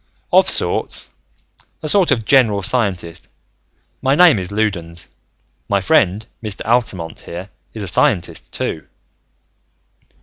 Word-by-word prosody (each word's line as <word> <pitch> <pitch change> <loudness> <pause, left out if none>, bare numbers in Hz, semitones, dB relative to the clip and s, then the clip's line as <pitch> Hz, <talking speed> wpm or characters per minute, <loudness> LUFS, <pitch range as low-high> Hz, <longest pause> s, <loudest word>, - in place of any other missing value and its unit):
"Of - - +5
sorts. - - 0 0.7
A - - -3
sort 185 +3 +3
of 120 -6 0
general 110 -7 +3
scientist. 90 -7 0 0.7
My 135 +1 +2
name 170 - +6
is 90 0 -6
Loudons. 85 -6 -3 0.6
My 100 - +2
friend, 100 - +1 0.2
Mr. 105 -2 -4
Altamont, 100 -9 -1
here, 90 +3 -9 0.2
is 110 - -5
a - - -4
scientist, 90 -2 0
too." 80 - -4
100 Hz, 115 wpm, -18 LUFS, 90-120 Hz, 0.7 s, name